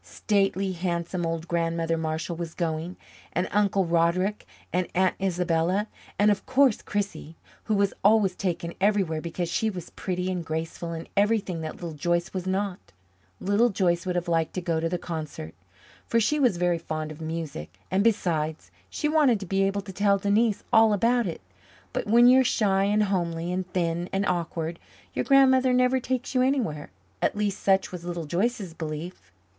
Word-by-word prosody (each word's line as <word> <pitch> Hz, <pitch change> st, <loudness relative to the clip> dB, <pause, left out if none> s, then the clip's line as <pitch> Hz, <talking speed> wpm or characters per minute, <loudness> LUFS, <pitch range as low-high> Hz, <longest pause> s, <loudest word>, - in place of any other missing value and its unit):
Stately, 195 Hz, -2 st, 0 dB
handsome 175 Hz, -1 st, -2 dB
old 165 Hz, 0 st, -3 dB
Grandmother 165 Hz, -1 st, 0 dB
Marshall 160 Hz, +1 st, -3 dB
was 165 Hz, -1 st, -6 dB
going, 165 Hz, +1 st, -3 dB, 0.4 s
and 180 Hz, -, 0 dB
Uncle 200 Hz, -2 st, +2 dB
Roderick 170 Hz, +4 st, +1 dB, 0.3 s
and 180 Hz, 0 st, +1 dB
Aunt 185 Hz, 0 st, +3 dB
Isabella, 180 Hz, +1 st, +1 dB, 0.3 s
and 210 Hz, +1 st, +5 dB
of 205 Hz, -, -1 dB
course 260 Hz, -3 st, +3 dB
Chrissie, 200 Hz, -6 st, -4 dB, 0.3 s
who 215 Hz, -, +1 dB
was 200 Hz, -1 st, +2 dB
always 205 Hz, -2 st, +4 dB
taken 170 Hz, -2 st, -3 dB
everywhere 195 Hz, -6 st, +2 dB
because 170 Hz, +1 st, -3 dB
she 220 Hz, +6 st, 0 dB
was 180 Hz, -5 st, -7 dB
pretty 180 Hz, 0 st, -3 dB
and 180 Hz, -2 st, -3 dB
graceful, 165 Hz, +1 st, -4 dB
and 165 Hz, 0 st, -6 dB
everything 200 Hz, -4 st, +1 dB
that 155 Hz, 0 st, -5 dB
Little 170 Hz, -2 st, -6 dB
Joyce 175 Hz, +3 st, -1 dB
was 185 Hz, -1 st, -4 dB
not. 190 Hz, 0 st, -1 dB, 0.6 s
Little 205 Hz, +5 st, +3 dB
Joyce 180 Hz, -3 st, 0 dB
would 180 Hz, -, -1 dB
have 175 Hz, -1 st, -1 dB
liked 165 Hz, -1 st, 0 dB
to -, -, 0 dB
go 170 Hz, -2 st, 0 dB
to 165 Hz, +1 st, -1 dB
the 180 Hz, -, -1 dB
concert, 155 Hz, -, -6 dB, 0.5 s
for 230 Hz, -, +2 dB
she 300 Hz, +7 st, +1 dB
was 245 Hz, -10 st, +3 dB
very 175 Hz, -1 st, +1 dB
fond 155 Hz, -1 st, -4 dB
of 155 Hz, +1 st, -10 dB
music; 155 Hz, -, -5 dB
and, 190 Hz, +2 st, +2 dB
besides, 160 Hz, -8 st, 0 dB, 0.2 s
she 300 Hz, -, -2 dB
wanted 295 Hz, -8 st, +3 dB
to 195 Hz, -, -6 dB
be 195 Hz, +2 st, 0 dB
able 195 Hz, +1 st, +1 dB
to 195 Hz, -1 st, -10 dB
tell 200 Hz, +1 st, +3 dB
Denise 205 Hz, +2 st, +1 dB
all 220 Hz, -1 st, +6 dB
about 235 Hz, +2 st, +2 dB
it. 165 Hz, -, -5 dB, 0.5 s
But -, -, -2 dB
when 235 Hz, +3 st, +6 dB
you 255 Hz, +2 st, +7 dB
are -, -, +5 dB
shy 195 Hz, -5 st, +2 dB
and 210 Hz, +1 st, +2 dB
homely 175 Hz, -4 st, -1 dB
and 185 Hz, 0 st, -3 dB
thin 175 Hz, 0 st, -1 dB
and 195 Hz, +1 st, 0 dB
awkward, 170 Hz, -2 st, -2 dB, 0.3 s
your -, -, -1 dB
grandmother 260 Hz, -2 st, +5 dB
never 250 Hz, +1 st, +3 dB
takes 255 Hz, +1 st, -3 dB
you 255 Hz, -, +3 dB
anywhere. 245 Hz, -, 0 dB, 0.3 s
At -, -, +1 dB
least, 205 Hz, -2 st, -1 dB
such 195 Hz, -1 st, +2 dB
was 180 Hz, -2 st, -7 dB
Little 175 Hz, -2 st, -4 dB
Joyce's 190 Hz, +3 st, -1 dB
belief. 155 Hz, -, -7 dB
185 Hz, 180 wpm, -26 LUFS, 165-205 Hz, 0.6 s, you